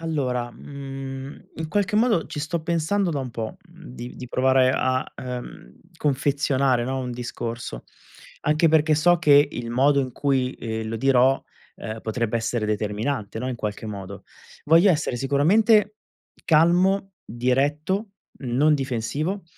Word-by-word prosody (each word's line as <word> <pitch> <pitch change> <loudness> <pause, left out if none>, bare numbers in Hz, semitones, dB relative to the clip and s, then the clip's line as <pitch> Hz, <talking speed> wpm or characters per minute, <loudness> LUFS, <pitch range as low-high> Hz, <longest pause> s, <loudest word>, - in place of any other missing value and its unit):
Allora, 130 -7 -2
mhmm, 135 0 -8
in 160 0 -4
qualche 205 +2 0
modo 220 -7 +2
ci 150 - -6
sto 155 +2 -3
pensando 170 +4 0
da 145 -4 -2
un 130 -2 -5
po', 115 -1 -5
mhmm, 170 0 -16
di 120 0 -8
di 125 - -8
provare 130 0 +3
a, 130 0 +1
uhm, 125 - -7 0.2
confezionare, 135 -3 +1
no, 130 +1 -2
un 125 -1 -4
discorso. 120 - -5 0.6
Anche 155 +2 +2
perché 155 0 +4
so 175 +3 +4
che 145 -3 +5
il 120 -1 -5
modo 140 +4 +3
in 130 -2 -4
cui, 130 -2 0
ehm, 110 -1 -4
lo 115 - -3
dirò, 135 +2 +3 0.4
ehm, 110 +1 -6
potrebbe 115 +1 -2
essere 115 -1 -1
determinante, 105 +1 -2
no, 125 +3 -3
in 125 - -3
qualche 105 0 -4
modo. 100 -2 -7 0.4
Voglio 165 +6 +6
essere 145 -6 0
sicuramente 205 - +3 0.5
calmo, 180 +5 +3
diretto, 145 - 0 0.3
non 135 +4 +2
difensivo. 140 - -2
135 Hz, 145 wpm, -24 LUFS, 120-160 Hz, 0.6 s, Voglio